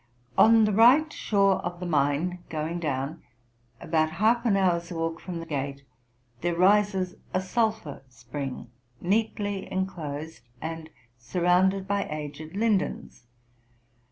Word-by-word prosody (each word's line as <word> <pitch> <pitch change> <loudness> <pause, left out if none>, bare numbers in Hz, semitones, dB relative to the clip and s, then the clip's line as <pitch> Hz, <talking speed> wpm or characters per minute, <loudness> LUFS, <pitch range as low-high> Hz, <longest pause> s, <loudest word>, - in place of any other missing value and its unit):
On 225 0 +6
the 210 - +1
right 260 +9 +6
shore 195 -2 +2
of 175 0 -5
the 180 - -5
Main, 155 +3 0
going 160 +2 -3
down, 145 0 -3 0.6
about 155 -1 0
half 225 +6 +2
an 200 -3 +3
hour's 175 -2 +1
walk 165 -1 -2
from 175 -2 -6
the 165 - -6
gate, 140 -2 -4 0.6
there 175 0 -1
rises 190 0 +3 0.2
a - - +3
sulphur 215 -5 -1
spring, 125 +1 -7 0.3
neatly 205 0 -1
enclosed, 160 -7 -4 0.2
and 160 +1 -6 0.3
surrounded 180 +7 +2
by 200 0 0
aged 150 +2 -6
lindens. 205 - -1
175 Hz, 125 wpm, -27 LUFS, 155-200 Hz, 0.6 s, On